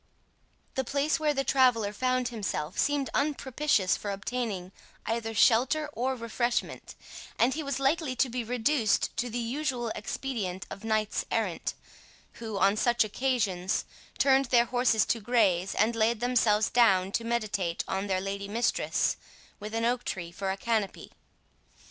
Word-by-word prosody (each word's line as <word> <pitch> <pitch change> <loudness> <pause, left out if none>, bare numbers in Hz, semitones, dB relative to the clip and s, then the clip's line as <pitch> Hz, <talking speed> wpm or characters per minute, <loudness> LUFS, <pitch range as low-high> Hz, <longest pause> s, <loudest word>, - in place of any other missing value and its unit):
The 265 - -1
place 285 +5 0
where 300 -1 +1
the 275 - +1
traveller 245 -7 +3
found 255 +2 0
himself 200 -7 -3
seemed 285 -2 +1
unpropitious 280 -7 +1
for 205 - -5
obtaining 200 -2 -3 0.3
either 225 0 -2
shelter 260 +8 +3
or 260 +2 -1
refreshment, 240 0 -2 0.4
and 250 +3 +3
he 315 - -3
was 280 -2 -3
likely 275 0 +1
to 265 - +2
be 245 0 -3
reduced 240 0 +1
to 245 - -1
the 235 - -4
usual 245 0 -2
expedient 210 -5 -4
of 200 - -8
knights 215 -1 0
errant, - - -2 0.6
who, 220 -3 -5
on 195 +2 +3
such 240 +1 +3
occasions, 210 -5 -1 0.3
turned 270 0 +4
their 240 -1 +4
horses 245 -3 +2
to 230 - 0
graze, 200 -5 +1
and 225 +2 +2
laid 225 0 +2
themselves 220 -4 +2
down 195 -6 +4
to 230 - -1
meditate 215 -7 -1
on 195 +1 -2
their 190 -1 +1
lady 200 +1 -4
mistress, 230 +4 0 0.4
with 215 +2 -6
an 230 0 0
oak 245 +1 0
tree 170 -2 -4
for 195 +2 -4
a 190 - -2
canopy. 220 -2 -2
230 Hz, 150 wpm, -28 LUFS, 205-255 Hz, 0.6 s, turned